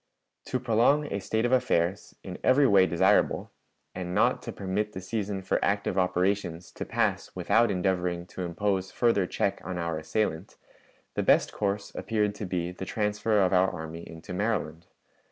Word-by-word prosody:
To 130 - -2
prolong 125 +5 +3
a 100 - -1
state 110 +4 -1
of 120 - 0
affairs, 95 -7 +1
in 90 -1 -7
every 135 +2 +5
way 100 -6 +5
desirable, 85 - +2 0.4
and 90 -1 -4
not - - +3
to - - -6
permit 105 +2 -2
the - - -5
season 100 0 -3
for - - 0
active 100 0 0
operations 90 -2 0
to - - -6
pass - - 0
without 115 0 +3
endeavoring 90 -2 -1
to - - -5
impose 95 +2 -1
further 115 -6 +2
check 100 +2 -1
on 95 -1 -4
our 85 -2 -2
assailant, 80 +2 -2 0.6
the - - -1
best - - +3
course 100 0 -2
appeared 105 -2 -1
to 105 -1 -6
be 90 -1 -2
the 90 - -8
transfer 105 +1 0
of 95 - +1
our 95 +1 +4
army 80 +1 -7
into 80 +2 -9
Maryland. 90 -5 -2
95 Hz, 170 wpm, -28 LUFS, 90-105 Hz, 0.6 s, every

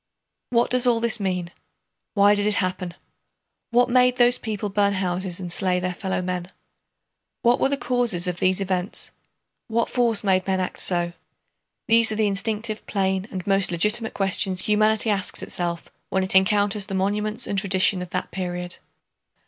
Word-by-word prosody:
What 235 -1 +1
does 250 0 +2
all 235 -2 +3
this 235 -1 +2
mean? 180 -3 -2 0.6
Why 205 0 +5
did 205 0 0
it 210 - +4
happen? 185 -2 -2 0.7
What 245 +1 +3
made 250 0 +3
those 245 0 +4
people 210 -2 -4
burn 200 0 +1
houses 185 -1 -2
and 175 -2 +1
slay 180 -1 +3
their 180 0 -3
fellow 190 0 -3
men? 180 0 -4 0.9
What 240 +1 +3
were - - +2
the 280 - -1
causes 240 -9 0
of 180 -1 -3
these 185 0 +1
events? 190 0 -3 0.6
What 230 +1 -1
force 235 -4 +1
made 190 -2 +1
men 190 -1 0
act 185 - -4
so? 175 -1 0 0.7
These 230 -1 +4
are - - -2
the 215 0 +1
instinctive, 210 +2 -2
plain, 190 -1 -1
and 185 -2 -6
most 195 -1 +3
legitimate 210 +7 +1
questions 195 -1 +1
humanity 215 +1 +2
asks 195 -2 -2
itself 170 -1 -4 0.2
when 190 - 0
it 185 - +1
encounters 205 +1 +2
the 195 - -4
monuments 210 +4 0
and 200 - 0
tradition 190 -1 +2
of 180 - -7
that - - -4
period. 180 -1 -4
195 Hz, 170 wpm, -23 LUFS, 185-220 Hz, 0.9 s, Why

